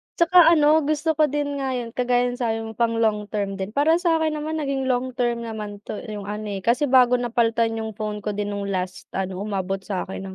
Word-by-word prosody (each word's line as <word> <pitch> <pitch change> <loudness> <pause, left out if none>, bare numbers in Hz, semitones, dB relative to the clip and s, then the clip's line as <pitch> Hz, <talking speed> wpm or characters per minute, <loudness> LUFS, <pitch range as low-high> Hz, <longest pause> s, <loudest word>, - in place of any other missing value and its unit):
'Tsaka 340 +2 +3 0.2
ano 305 -1 +4
gusto 310 +1 0
ko 310 - +5
din 290 0 -2
nga 265 -1 -2
yun, 240 -2 -3
kagaya 245 +1 +1
nung 245 - -5
sabi 225 -2 -1
mo 220 - -11 0.2
long 210 -2 +1
term 200 -2 -2
din, 195 +2 -5
para 315 +4 +3
sa 330 -2 +1
akin 310 -1 0
naman 310 +1 -3
naging 275 -2 -2
long 255 0 0
term 240 -2 0
naman 210 -3 -6
'to 215 - -6
yung 205 -2 -6
ano 210 +1 -4 0.2
kasi 240 +8 +2
bago 250 -2 +5
napaltan 230 -1 +1
yung 220 -2 -6
phone 210 -1 -4
ko 210 - -3
din 205 0 -3
nung 200 0 -4
last 185 -1 -4
ano, 190 0 -3
umabot 195 -2 -2
sa 190 -1 -3
akin 190 - -7
235 Hz, 220 wpm, -23 LUFS, 210-280 Hz, 0.2 s, ko